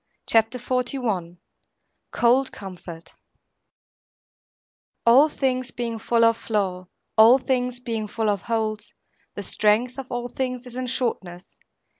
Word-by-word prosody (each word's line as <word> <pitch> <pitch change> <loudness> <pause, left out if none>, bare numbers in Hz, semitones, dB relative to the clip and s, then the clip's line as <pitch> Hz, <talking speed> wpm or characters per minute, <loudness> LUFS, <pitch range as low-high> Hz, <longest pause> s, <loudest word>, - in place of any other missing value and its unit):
CHAPTER 225 +2 +2
XLI 245 -8 -2 0.7
COLD 255 +3 +2
COMFORT 175 -4 -10 1.9
All 265 +7 +6
things 255 -3 -1
being 235 -2 -4
full 230 +1 +2
of 230 0 +3
flaw, 190 -4 -2 0.3
all 230 +4 +8
things 250 -2 -1
being 225 -3 -3
full 220 0 0
of 200 -2 -2
holes, 220 -2 -3 0.4
the - - -5
strength 235 +5 +1
of 265 - -6
all 245 0 -3
things 255 0 -4
is 250 - -11
in 255 0 -4
shortness. 190 -8 -3
235 Hz, 120 wpm, -24 LUFS, 210-250 Hz, 1.9 s, all